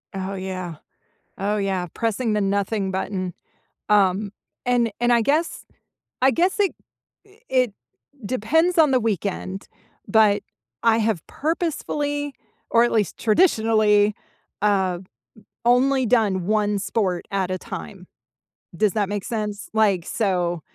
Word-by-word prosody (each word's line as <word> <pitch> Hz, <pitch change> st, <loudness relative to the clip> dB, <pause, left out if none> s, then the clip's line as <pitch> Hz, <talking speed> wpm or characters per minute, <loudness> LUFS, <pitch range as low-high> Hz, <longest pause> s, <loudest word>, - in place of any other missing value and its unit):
Oh, 190 Hz, +1 st, -3 dB
yeah. 185 Hz, -3 st, -5 dB, 0.6 s
Oh, 205 Hz, +2 st, 0 dB
yeah, 195 Hz, -3 st, -1 dB
pressing 225 Hz, 0 st, -1 dB
the 210 Hz, -, +1 dB
nothing 200 Hz, 0 st, 0 dB
button. 185 Hz, -1 st, -3 dB, 0.6 s
Um, 200 Hz, 0 st, +3 dB, 0.3 s
and 245 Hz, -2 st, +2 dB
and 240 Hz, 0 st, +2 dB
I 235 Hz, -, +4 dB
guess 305 Hz, +8 st, 0 dB, 0.6 s
I 265 Hz, -, +5 dB
guess 360 Hz, -, +1 dB
it 400 Hz, -3 st, +2 dB, 0.5 s
i 405 Hz, +2 st, -23 dB
it 255 Hz, -5 st, +2 dB, 0.5 s
depends 320 Hz, -, +1 dB
on 310 Hz, -4 st, +6 dB
the 255 Hz, -, +4 dB
weekend, 200 Hz, -3 st, -3 dB, 0.4 s
but 210 Hz, -1 st, +4 dB, 0.4 s
I 225 Hz, -1 st, +4 dB
have 215 Hz, -7 st, 0 dB
purposefully, 295 Hz, -2 st, -2 dB, 0.4 s
or 230 Hz, -, +5 dB
at 240 Hz, -, +1 dB
least 210 Hz, -4 st, 0 dB
traditionally, 215 Hz, -, +3 dB, 0.5 s
uh, 190 Hz, -4 st, +2 dB, 0.7 s
o 240 Hz, -, +6 dB
only 265 Hz, 0 st, +2 dB
done 210 Hz, -6 st, +2 dB
1 210 Hz, -1 st, +1 dB
sport 195 Hz, -3 st, -1 dB
at 190 Hz, -2 st, -1 dB
a 185 Hz, -, -1 dB
time. 80 Hz, -, -8 dB, 0.7 s
Does 210 Hz, +1 st, +2 dB
that 205 Hz, -3 st, 0 dB
make 205 Hz, -1 st, -3 dB
sense? 210 Hz, -3 st, -4 dB
Like, 200 Hz, -6 st, +3 dB
so, 180 Hz, -5 st, 0 dB
210 Hz, 130 wpm, -23 LUFS, 195-240 Hz, 0.7 s, on